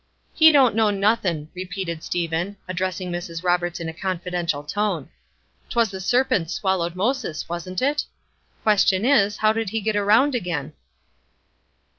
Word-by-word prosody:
"He 320 Hz, 0 st, +7 dB
don't 270 Hz, -6 st, +5 dB
know 220 Hz, -1 st, +3 dB
nothin'!" 195 Hz, -7 st, 0 dB
repeated 180 Hz, -2 st, -5 dB
Stephen, 170 Hz, +3 st, -2 dB
addressing 185 Hz, 0 st, -3 dB
Mrs. 175 Hz, -1 st, -5 dB
Roberts 175 Hz, -1 st, 0 dB
in 165 Hz, -, -4 dB
a 160 Hz, -, -5 dB
confidential 175 Hz, -4 st, -3 dB
tone. 180 Hz, -2 st, -2 dB, 0.6 s
"'T -, -, -7 dB
was 230 Hz, -4 st, +2 dB
the 190 Hz, -1 st, -6 dB
serpents 195 Hz, -6 st, +1 dB
swallowed 180 Hz, -3 st, -1 dB
Moses, 200 Hz, -, -2 dB
wasn't 175 Hz, +4 st, -4 dB
it? 290 Hz, +2 st, +1 dB, 0.6 s
Question 205 Hz, -1 st, +3 dB
is, 210 Hz, -7 st, +3 dB
How 215 Hz, 0 st, +3 dB
did 225 Hz, -2 st, -2 dB
he 225 Hz, +3 st, -2 dB
get 215 Hz, 0 st, -1 dB
around 220 Hz, +8 st, +4 dB
again?" 160 Hz, -, -3 dB
190 Hz, 145 wpm, -23 LUFS, 170-215 Hz, 0.6 s, He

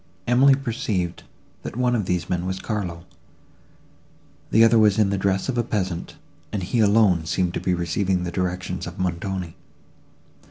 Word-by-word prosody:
—Emily 130 Hz, +3 st, +5 dB
perceived, 110 Hz, -9 st, -3 dB, 0.4 s
that -, -, -7 dB
one 125 Hz, 0 st, +1 dB
of 105 Hz, -5 st, -1 dB
these 90 Hz, -1 st, -1 dB
men 90 Hz, 0 st, -2 dB
was 95 Hz, 0 st, -3 dB
Carlo; 90 Hz, -6 st, -4 dB, 1.4 s
the 115 Hz, -, +5 dB
other 115 Hz, 0 st, +5 dB
was 105 Hz, -1 st, +4 dB
in 105 Hz, -2 st, +3 dB
the 100 Hz, -, 0 dB
dress 95 Hz, 0 st, 0 dB
of 125 Hz, -3 st, -1 dB
a -, -, +2 dB
peasant, 95 Hz, -6 st, -3 dB, 0.4 s
and 100 Hz, -3 st, -3 dB
he 105 Hz, +7 st, -1 dB
alone 100 Hz, -6 st, +4 dB
seemed 90 Hz, 0 st, 0 dB
to -, -, -2 dB
be 90 Hz, -, 0 dB
receiving 90 Hz, +2 st, 0 dB
the 90 Hz, -, -3 dB
directions 90 Hz, 0 st, -3 dB
of 85 Hz, -, -8 dB
Montoni. 90 Hz, -1 st, -3 dB
95 Hz, 165 wpm, -23 LUFS, 90-110 Hz, 1.4 s, Emily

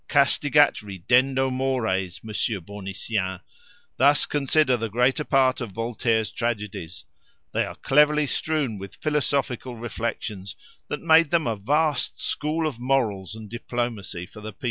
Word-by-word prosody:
"Castigat 145 Hz, 0 st, +4 dB
ridendo 130 Hz, +7 st, +1 dB
mores, 110 Hz, -9 st, -1 dB
Monsieur 110 Hz, -1 st, -1 dB
Bournisien! 95 Hz, 0 st, -4 dB, 0.6 s
Thus 145 Hz, +3 st, +5 dB
consider 145 Hz, -2 st, +2 dB
the 115 Hz, -1 st, -3 dB
greater 125 Hz, +7 st, +2 dB
part 135 Hz, -2 st, +2 dB
of 115 Hz, -5 st, -5 dB
Voltaire's 115 Hz, 0 st, 0 dB
tragedies; 105 Hz, -7 st, -4 dB, 0.5 s
they -, -, 0 dB
are -, -, -8 dB
cleverly 150 Hz, +2 st, +4 dB
strewn 145 Hz, -7 st, -1 dB
with 100 Hz, -1 st, -9 dB
philosophical 140 Hz, -4 st, -1 dB
reflections, 110 Hz, -4 st, -4 dB, 0.3 s
that 150 Hz, -, -4 dB
made 165 Hz, -1 st, +6 dB
them 165 Hz, -1 st, +2 dB
a 115 Hz, -, 0 dB
vast 145 Hz, +9 st, 0 dB
school 155 Hz, +2 st, -1 dB
of 145 Hz, -7 st, -3 dB
morals 110 Hz, -7 st, 0 dB
and 110 Hz, -1 st, -9 dB
diplomacy 120 Hz, -5 st, -4 dB
for 105 Hz, +3 st, -13 dB
the 110 Hz, 0 st, -7 dB
people." -, -, -40 dB
120 Hz, 135 wpm, -25 LUFS, 105-140 Hz, 0.6 s, made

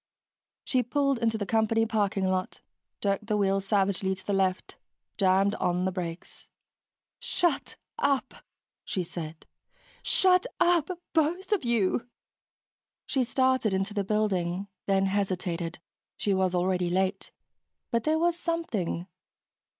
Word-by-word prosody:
She 255 Hz, -, +2 dB
pulled 275 Hz, +1 st, +1 dB
into 225 Hz, -1 st, +1 dB
the 205 Hz, -, -2 dB
company 225 Hz, +2 st, +2 dB
parking 205 Hz, -3 st, 0 dB
lot, 185 Hz, 0 st, -1 dB, 0.4 s
jerked 200 Hz, +1 st, 0 dB
the 210 Hz, -2 st, +1 dB
wheel 195 Hz, -1 st, +2 dB
savagely 195 Hz, -1 st, +1 dB
to 190 Hz, 0 st, -16 dB
the 205 Hz, -, -1 dB
left, 190 Hz, -1 st, 0 dB, 0.4 s
jammed 195 Hz, 0 st, +3 dB
on 180 Hz, -3 st, 0 dB
the 190 Hz, -, +1 dB
brakes. 175 Hz, -2 st, -7 dB, 0.7 s
"Shut 345 Hz, -5 st, 0 dB, 0.2 s
up!" 280 Hz, -, +1 dB, 0.5 s
she 185 Hz, -, -2 dB
said. 165 Hz, -2 st, -7 dB, 0.6 s
"Shut 370 Hz, +4 st, +3 dB
up, 350 Hz, -2 st, +3 dB, 0.2 s
both 340 Hz, +5 st, +1 dB
of 415 Hz, -7 st, +2 dB
you!" 235 Hz, 0 st, +1 dB, 1.0 s
She 265 Hz, -3 st, +1 dB
started 260 Hz, -4 st, +2 dB
into 195 Hz, +2 st, -1 dB
the 205 Hz, -1 st, 0 dB
building, 195 Hz, -3 st, 0 dB, 0.2 s
then 195 Hz, -1 st, +3 dB
hesitated. 185 Hz, -4 st, -1 dB, 0.4 s
She 200 Hz, -, +1 dB
was 190 Hz, -1 st, +1 dB
already 180 Hz, 0 st, +1 dB
late, 190 Hz, +2 st, -1 dB, 0.6 s
but 230 Hz, -1 st, +1 dB
there 310 Hz, +1 st, +2 dB
was 340 Hz, +1 st, +2 dB
something.... 285 Hz, -, -2 dB
200 Hz, 125 wpm, -28 LUFS, 185-250 Hz, 1.0 s, jammed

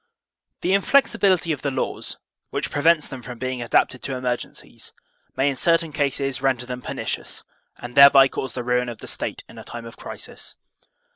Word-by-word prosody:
The 185 Hz, -, +1 dB
inflexibility 200 Hz, -5 st, +3 dB
of 145 Hz, -, -3 dB
the 140 Hz, -, -1 dB
laws, 130 Hz, -1 st, -3 dB, 0.3 s
which -, -, -3 dB
prevents 155 Hz, +2 st, +3 dB
them 135 Hz, -2 st, -8 dB
from 125 Hz, 0 st, -8 dB
being 130 Hz, 0 st, -3 dB
adapted 120 Hz, +1 st, +1 dB
to 135 Hz, -, -4 dB
emergencies, 125 Hz, -1 st, -5 dB, 0.4 s
may 135 Hz, -, +2 dB
in 140 Hz, -, +1 dB
certain 165 Hz, +3 st, +2 dB
cases 140 Hz, -2 st, -1 dB
ren 135 Hz, -1 st, +2 dB
der 120 Hz, -, -8 dB
them 125 Hz, 0 st, -6 dB
pernicious, -, -, -5 dB, 0.3 s
and 120 Hz, 0 st, -9 dB
thereby 140 Hz, 0 st, +9 dB
cause 135 Hz, -1 st, -4 dB
the 125 Hz, -, -4 dB
ruin 125 Hz, 0 st, 0 dB
of 120 Hz, -, -7 dB
the -, -, -11 dB
State -, -, -4 dB
in -, -, -12 dB
a -, -, -9 dB
time 120 Hz, -1 st, -8 dB
of 115 Hz, 0 st, -11 dB
crisis. -, -, -8 dB
135 Hz, 185 wpm, -23 LUFS, 125-150 Hz, 0.4 s, thereby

